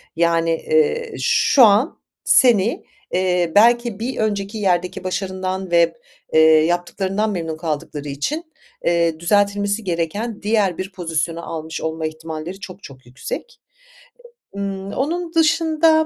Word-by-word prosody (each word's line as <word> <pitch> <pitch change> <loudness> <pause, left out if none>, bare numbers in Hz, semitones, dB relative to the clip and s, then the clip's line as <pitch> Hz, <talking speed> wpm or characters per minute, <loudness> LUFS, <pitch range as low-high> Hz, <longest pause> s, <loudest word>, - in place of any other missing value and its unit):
Yani, 165 0 +2
eee, 465 - 0
şu 265 - +4
an 215 +8 +2 0.2
seni, 230 -3 +3 0.3
eee, 180 -2 +1
belki 235 0 +4
bir 250 +3 -3
önceki 205 -1 -2
yerdeki 180 -3 0
başarından 185 0 -3
ve, 170 -1 +4 0.4
eee, 160 - +5 0.3
yaptıklarından 190 +5 -1
memnun 165 -4 -4
kaldıkları 150 -2 -4
için, 280 - -3 0.4
eee, 170 -2 +1
düzeltilmesi 205 +3 +1
gereken 190 +5 -3
diğer 205 -4 +1
bir 190 +1 -5
pozisyonu 165 -1 -3
almış 160 0 -5
olma 160 0 -3
ihtimalleri 160 +3 -6
çok 190 0 -10
çok 130 -2 -13
yüksek. 140 - -7 0.9
Imm, 195 -1 -4
onun 335 +5 -2
dışında 320 -1 +3
190 Hz, 120 wpm, -20 LUFS, 165-225 Hz, 0.9 s, eee